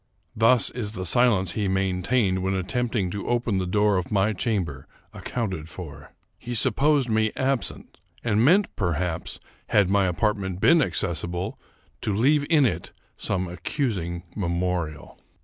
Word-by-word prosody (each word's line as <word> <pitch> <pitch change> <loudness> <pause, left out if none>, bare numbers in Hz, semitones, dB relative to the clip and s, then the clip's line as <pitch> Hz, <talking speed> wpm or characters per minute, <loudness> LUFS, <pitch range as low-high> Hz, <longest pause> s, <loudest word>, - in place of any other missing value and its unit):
Thus 115 +2 +4
is 110 -4 -4
the 95 -3 -5
silence 100 -3 +3
he 105 +1 -1
maintained 95 +1 +1
when 95 +1 0
attempting 105 0 -1
to 100 - -5
open 120 -5 0
the 95 - -2
door 105 +1 +2
of 90 - -3
my 105 +1 +2
chamber, 90 - -2 0.3
ac - - -10
counted 95 -10 -3
for. 75 -4 -10 0.3
He 120 0 -5
supposed 135 +4 +3
me 110 -1 +1
absent, 135 -1 -2 0.2
and 110 -1 +2
meant, 185 +9 +3
perhaps, 85 -2 -2 0.3
had 100 -3 +3
my 100 -1 +3
apartment 95 -1 -1
been 165 +9 +5
accessible, 85 - -2 0.4
to 105 - -1
leave 145 +5 +3
in 155 -5 +5
it 90 -8 -2 0.2
some 95 -1 -2
accus 100 - -2
ing 85 +1 -5
memorial. 85 -4 -3
100 Hz, 150 wpm, -25 LUFS, 90-120 Hz, 0.4 s, been